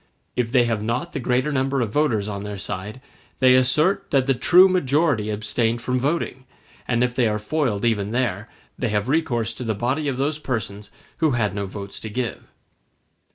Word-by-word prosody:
If 120 -2 -1
they 125 -2 +5
have 115 -3 -1
not 115 +3 -2
the - - -2
greater 125 +4 0
number 135 0 0
of 115 -4 -2
voters 120 -9 +1
on 100 -2 -4
their 105 -1 -5
side, 105 +5 -5 0.4
they 130 -1 +5
assert 155 +10 +3
that 135 -3 +2
the 135 - +3
true 180 +9 +6
majority 145 - +1
abstained 115 +3 -1
from 125 0 0
voting; 135 -2 -2 0.4
and 120 0 +2
if 125 0 -1
they 125 -3 +3
are 105 -1 0
foiled 115 -2 -1
even 105 -3 +1
there, 115 -3 -1 0.3
they 120 - 0
have 105 +1 0
recourse 120 -7 0
to 125 - -7
the 110 -2 -1
body 130 +8 -1
of 135 -3 -1
those 145 +3 -1
persons 105 -7 -4 0.3
who 160 -4 +2
had 105 -5 0
no 100 -1 -3
votes 100 0 -8
to 110 - -7
give. 120 +2 -3
120 Hz, 195 wpm, -23 LUFS, 105-135 Hz, 0.4 s, true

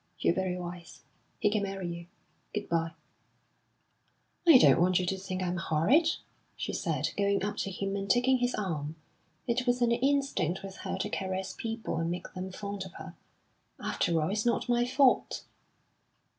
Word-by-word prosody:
You're - - +2
very 185 0 -1
wise. 175 -1 -8 0.3
He 210 - +2
can 210 -1 +1
marry 195 -2 -3
you. 170 0 -6 0.5
Good 210 0 -2
bye!" 165 -1 0 1.5
"I 320 -6 +10
don't 210 - +6
want 180 0 +4
you 180 - 0
to 190 - 0
think 190 -1 -4
I'm 180 0 -1
horrid," 170 - +3 0.5
she - - -4
said, - - -1
going 200 -1 +1
up 205 0 -3
to - - -1
him 195 +1 -3
and 195 0 -3
taking 250 +1 +4
his 245 0 +1
arm. 160 -6 -3 0.5
It 250 +1 0
was 245 0 +3
an 240 -1 +3
instinct 245 - +1
with 195 -1 -8
her - - -4
to 210 - -2
caress 190 0 -2
people 225 -6 -3
and 165 0 0
make 175 +1 -5
them 185 0 -5
fond 200 0 -5
of 190 - -10
her. - - -9 0.7
"After 165 -1 0
all, 155 +3 0
it's 210 +1 0
not 240 +1 +1
my 240 0 +3
fault." 265 0 +3
195 Hz, 175 wpm, -30 LUFS, 180-235 Hz, 1.5 s, I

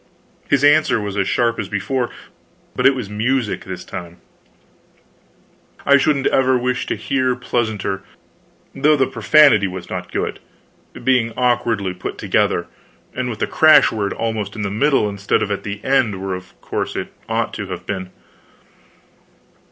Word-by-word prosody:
His 140 -1 +2
answer 150 -4 +4
was 105 -1 -4
as 100 -2 0
sharp 115 -1 +1
as - - -4
before, 120 +5 -1 0.7
but - - +4
it 135 - +4
was 125 -6 -4
music 110 +3 -1
this 95 -1 -7
time; 85 -2 -8 1.7
I 140 0 +6
shouldn't 140 -1 +1
ever 130 -1 +3
wish 125 +1 -1
to - - -1
hear 125 +4 0
pleasanter, 110 -6 -2 0.7
though 150 +1 +3
the 135 -2 +2
profanity 125 -3 +5
was 90 -1 -8
not 90 -1 -5
good, - - -3 0.6
being 125 -3 +2
awkwardly 120 -6 +1
put 90 - -6
together, - - +1 0.5
and 125 -1 -2
with 115 - -5
the - - 0
crash 155 -3 +6
word 105 -3 -2
almost 110 -3 -3
in 105 - -4
the 100 - -2
middle 135 +1 +2
instead 100 -1 0
of 105 - -3
at 100 - -2
the 100 0 -5
end, 125 -7 +1
where, 95 0 -3
of 90 0 -9
course, - - -3
it - - -5 0.2
ought 115 +1 -1
to 105 -3 -5
have 90 -1 -7
been. 95 -2 -4
115 Hz, 160 wpm, -19 LUFS, 100-130 Hz, 1.7 s, I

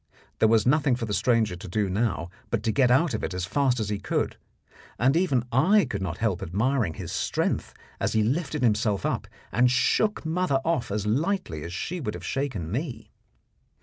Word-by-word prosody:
There 110 - +5
was 115 -1 +4
nothing 135 -1 +3
for 120 -2 -3
the 105 - -3
stranger 110 -1 +2
to 95 +4 -9
do 100 +3 0
now 95 -3 -1 0.2
but 115 -2 -1
to 110 - +1
get 130 +1 +3
out 135 +7 +3
of - - -3
it 90 - -3
as 90 -1 -2
fast 125 +4 +1
as 105 -2 -2
he 105 -1 -2
could; - - -1 0.6
and 130 +4 +3
even 165 -9 +2
I 185 - +4
could 100 - -4
not 85 -3 -3
help 105 -5 0
admiring 105 - 0
his - - -6
strength - - -1 0.2
as - - 0
he 110 - +3
lifted 145 +4 -1
himself 105 -3 +1
up - - -1 0.2
and 120 +6 +4
shook 210 +11 +1
mother 160 -4 +1
off 165 -7 0
as 105 0 -2
lightly 145 - -1
as 85 - -6
she 175 - -4
would 110 -8 -3
have - - -8
shaken 120 - -2
me. 130 +3 -4
115 Hz, 200 wpm, -26 LUFS, 100-140 Hz, 0.6 s, There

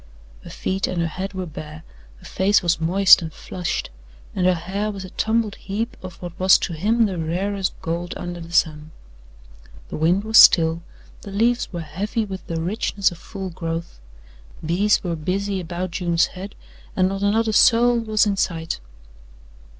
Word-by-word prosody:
Her - - -10
feet 190 0 -2
and 180 - -3
her 170 - +1
head 190 +4 -5
were 185 -1 -4
bare, 155 -1 -9 0.3
her - - -18
face 200 +1 +2
was 170 -2 +1
moist 190 +3 +6
and 160 -1 -5
flushed 175 - -4 0.4
and 185 -1 +2
her 185 - +4
hair 195 +5 -3
was 195 -2 -6
a 185 - -11
tumbled 220 -1 0
heap 220 +4 -4
of 185 -2 -9
what 175 +1 -8
was 185 0 +6
to 175 - -4
him 220 +8 +2
the 190 -4 -3
rarest 185 +4 -2
gold 170 +1 -3
under 175 -1 -6
the 165 0 -10
sun. 155 -3 +1 1.0
The - - -5
wind 175 +6 +2
was 220 0 +5
still, 165 0 +6 0.4
the - - -9
leaves 230 +5 +1
were 175 -2 -4
heavy 195 +8 -3
with 190 -3 -8
the 165 -1 -3
richness 195 +2 0
of 170 - -11
full 190 -3 -7
growth, 165 - -5 0.7
bees 195 +6 +2
were 175 -3 -2
busy 190 +5 -2
about 175 +1 -4
June's 170 -1 +1
head 195 +2 -8 0.4
and 185 -1 +3
not 195 +1 -3
another 220 +2 +1
soul 235 +2 +5
was 215 -2 +2
in 200 -2 0
sight. 165 -3 -2
185 Hz, 175 wpm, -22 LUFS, 170-205 Hz, 1.0 s, moist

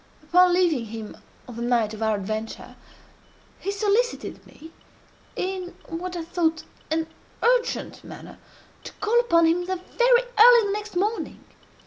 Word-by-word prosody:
Upon 360 +4 +4
leaving 330 -10 +2
him 220 -1 -8 0.3
on 240 -2 -10
the - - -5
night 235 -3 +1
of 215 - -9
our 220 -1 +1
adventure, 215 +3 -5 0.8
he 395 - -3
solicited 425 +4 -1
me, 320 +2 -14 0.6
in 370 -1 -4
what 355 +2 -5
I 335 - -4
thought 325 -1 -1 0.3
an 320 +1 0 0.4
urgent 485 0 0
manner, - - -11 0.4
to - - -9
call 440 +3 +1
upon 335 -9 +3
him 335 +2 +2
very 370 0 -3 0.6
early 475 0 +8
the 400 - -1
next 420 -1 -6
morning. 420 +5 -2
350 Hz, 140 wpm, -24 LUFS, 250-405 Hz, 0.8 s, early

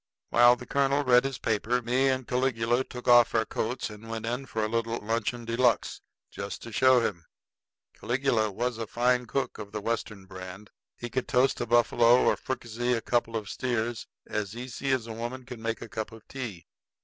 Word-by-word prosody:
While 120 +1 +7
the 125 0 -10
colonel 140 +2 +1
read 125 -1 +5
his 135 -2 -2
paper, 115 +3 0
me 125 +3 +2
and 130 -2 -1
Caligula 125 -1 +1
took 125 -1 -10
off 120 -1 +6
our 115 0 +3
coats 120 +4 -2
and 105 +2 -11
went 115 0 -4
in 125 +4 -3
for 110 -2 -2
a - - +1
little 115 +1 -1
luncheon 115 +2 -2
de 115 0 -2
luxe 120 -2 +2 0.3
just 100 0 -6
to 115 - -8
show 130 +2 +5
him. 85 -8 -3 0.7
Caligula 120 -4 0
was 120 +3 -2
a 115 - -3
fine 125 +1 +1
cook 135 0 -2
of 100 -1 -8
the 105 - -3
Western 105 -2 -3
brand. 95 +2 -10 0.3
He 120 -1 -6
could 130 +1 -2
toast 130 +2 +2
a - - -2
buffalo 120 +1 +5
or - - +4
fricassee 120 -1 -2
a 115 - 0
couple 115 -1 0
of 105 -2 -6
steers 120 -1 -2 0.2
as 105 0 -3
easy 130 +2 -5
as 130 -4 +1
a 115 - -6
woman 120 +3 -5
could 125 -1 -8
make 115 0 -3
a - - -8
cup 110 +1 -5
of 110 -1 -14
tea. 115 - -6
120 Hz, 200 wpm, -28 LUFS, 110-125 Hz, 0.7 s, While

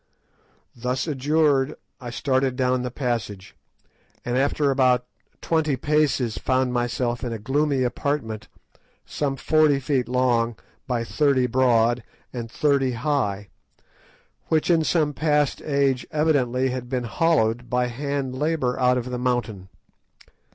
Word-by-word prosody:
Thus 125 +2 -2
adjured, 145 -1 +1 0.2
I 125 -3 -7
started 130 +1 0
down 130 -1 +1
the 125 - -3
passage, 115 -7 -4 0.7
and 120 - -1
after 140 +2 +1
about 125 -2 +3 0.4
twenty 160 -4 +1
paces 135 -6 0
found 130 -1 0
myself 120 0 -1
in 120 - -3
a 115 - -3
gloomy 135 +4 0
apartment 120 -4 -2 0.6
some 140 -2 -2
forty 155 -1 +3
feet 130 -2 -1
long, 120 -2 +1 0.3
by 120 -3 -1
thirty 140 0 +2
broad, 120 -1 +2 0.3
and 120 -2 -5
thirty 135 0 +1
high, 110 -7 -1 1.0
which 160 +2 +2
in 165 -2 +3
some 155 -2 +1
past 150 -2 +1
age 140 -3 0
evidently 130 -5 +1
had 125 -1 -5
been 125 -1 -1
hollowed, 120 -2 +1
by 125 +1 +1
hand 135 +1 -3
labour, 140 -2 -1
out 125 0 +3
of 125 0 -4
the 125 - -3
mountain. 115 -7 -2
130 Hz, 130 wpm, -24 LUFS, 120-145 Hz, 1.0 s, about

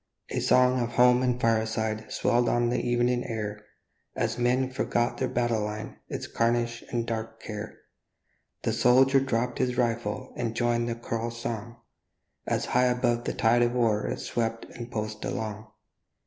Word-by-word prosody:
A - - 0
song 125 0 +4
of 120 0 -2
home 125 +1 +5
and 125 -1 +1
fireside 110 -1 0
Swelled 120 0 +2
on 120 0 +2
the 120 - 0
evening 120 0 +1
air, 105 -3 -4 0.5
And - - 0
men 130 +2 +2
forgot 120 -1 0
their 130 - +1
battle 120 -3 0
line, 105 +1 -5
Its - - -4
carnage 115 0 0
and 120 -1 -1
dark 115 -1 -4
care; 105 0 -7 0.9
The - - 0
soldier 135 +2 +5
dropp'd 125 -2 -1
his 125 -1 0
rifle 120 0 -1
And 115 -2 -2
joined 120 0 +1
the 115 - -2
choral 115 0 -3
song, 115 0 -6 0.7
As - - 0
high 125 +1 +3
above 120 -1 +1
the - - -1
tide 120 +1 +3
of 120 0 +2
war 115 -4 +1
It - - -2
swept 115 -1 -2
and 120 0 -7
pulsed 105 -2 -4
along. 110 -1 -4
120 Hz, 160 wpm, -27 LUFS, 115-125 Hz, 0.9 s, home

